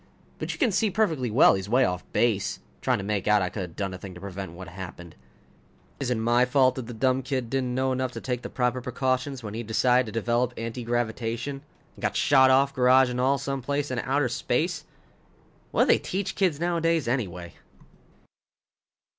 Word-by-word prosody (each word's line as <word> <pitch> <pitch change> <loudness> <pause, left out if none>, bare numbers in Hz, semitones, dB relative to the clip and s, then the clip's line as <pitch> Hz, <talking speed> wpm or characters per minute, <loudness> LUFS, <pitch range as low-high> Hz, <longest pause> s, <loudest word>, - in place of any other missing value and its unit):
But - - -3
you - - -6
can 255 -9 +2
see 215 +3 +2
perfectly 165 - 0
well 110 - +6
he's 95 +1 -3
way 125 +3 +4
off 90 0 -2
base, 110 -5 +1 0.2
trying - - +1
to 100 - -5
make 100 -1 -2
out 105 -2 +4
I 90 - -1
could 100 - -5
have 90 -3 -7
done 95 -2 -3
a 90 - -7
thing 95 -2 -9
to - - -9
prevent 95 -2 -7
what 95 +2 -9
happened. 85 -2 -9 0.8
Is 135 - -2
it 125 - +1
my 120 +2 +3
fault 130 0 +3
if 120 - -6
the 120 - -6
dumb 130 +2 +1
kid 130 -3 -3
didn't 130 -2 -1
know 130 0 +1
enough 130 0 -1
to - - -5
take 125 -2 -3
the 120 - -6
proper 125 0 -1
precautions 130 +1 -2
when 105 -1 -6
he 115 - -3
decided 125 +2 +2
to 110 +1 -2
develop 120 +2 0
anti 115 +2 -5
gravitation 120 +3 -2 0.3
and - - -15
got - - -1
shot 130 -2 +5
off, 135 +1 +4
garage 130 0 +4
and 125 0 -2
all, 135 +2 +3
someplace 140 +1 -2
into 130 0 -3
outer 140 0 +2
space? 150 +7 -1 0.8
What - - +3
do - - -1
they - - +5
teach 190 +1 -3
kids 180 -7 +1
nowadays, 165 -3 +1
anyway? 90 - -3
125 Hz, 205 wpm, -26 LUFS, 110-135 Hz, 0.8 s, well